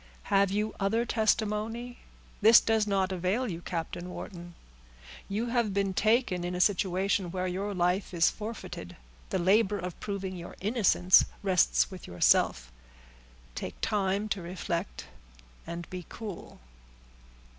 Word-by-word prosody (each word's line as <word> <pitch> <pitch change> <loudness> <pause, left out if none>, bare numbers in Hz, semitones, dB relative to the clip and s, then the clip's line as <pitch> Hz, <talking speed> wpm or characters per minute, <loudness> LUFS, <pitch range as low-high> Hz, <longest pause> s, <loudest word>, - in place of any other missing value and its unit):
"Have 195 0 +5
you 210 +2 -1
other 220 +4 +1
testimony? 220 +2 -1 0.4
This 220 +2 +9
does 220 -1 +1
not 195 -2 +1
avail 190 +6 -1
you, 170 0 -6
Captain 175 +1 -5
Wharton. 175 -1 -8 0.7
You 220 +4 -2
have 230 -5 0
been 200 -1 +1
taken 215 -3 +2
in 175 +1 -3
a - - -3
situation 190 0 +1
where 185 +1 -3
your 195 +3 -3
life 180 +2 0
is 170 -2 +3
forfeited; 220 +1 -7 0.3
the - - 0
labor 200 +3 +3
of 180 -2 -6
proving 195 -2 -4
your 175 -1 -8
innocence 200 -3 +4 0.2
rests 190 0 +3
with 185 -2 -9
yourself. 60 -7 +2 0.8
Take - - -6
time 200 -1 0
to 195 -2 -2
reflect, 175 +1 -4 0.6
and 170 0 -6
be 180 -1 -5
cool." 215 -5 -8
195 Hz, 135 wpm, -29 LUFS, 180-215 Hz, 0.8 s, This